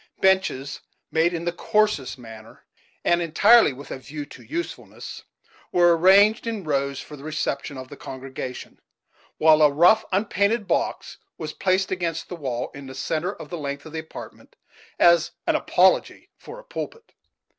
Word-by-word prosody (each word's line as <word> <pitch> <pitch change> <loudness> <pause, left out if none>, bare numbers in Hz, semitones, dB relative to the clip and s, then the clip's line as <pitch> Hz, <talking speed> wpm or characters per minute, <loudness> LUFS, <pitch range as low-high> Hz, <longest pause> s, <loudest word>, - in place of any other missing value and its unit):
Benches; 190 -8 +1 0.3
made 160 +2 +3
in 170 -1 -4
the 175 - +1
coarsest 210 -8 0
manner, 115 -2 -13 0.4
and 175 0 +3
entirely 200 +6 +5
with 140 +2 -11
a - - -5
view 145 +3 -7
to - - -14
usefulness, 340 +2 -6 0.5
were 175 -1 +5
arranged 200 +6 +5
in 220 -4 -3
rows 140 -3 -1
for 150 - -9
the 140 - -13
reception 155 -2 -3
of 130 0 -8
the - - -9
Congregation; 130 -1 -8 0.6
while 155 -1 +5
a 150 - +7
rough, 175 +9 +5
unpainted 205 +2 +1
box - - -2 0.2
was 155 -1 -5
placed 190 0 0
against 170 -3 -3
the 180 - -5
wall, 130 -7 -4
in 140 -1 -10
the 130 - -9
centre 160 +7 -2
of - - -11
the 175 - -4
length 140 -1 -5
of 160 - -11
the 160 - -3
apartment, 160 - -11 0.4
as 170 -1 +4
an - - +2
apology - - +2
for - - -11
a - - -12
pulpit. 480 -1 -8
165 Hz, 165 wpm, -24 LUFS, 140-190 Hz, 0.6 s, a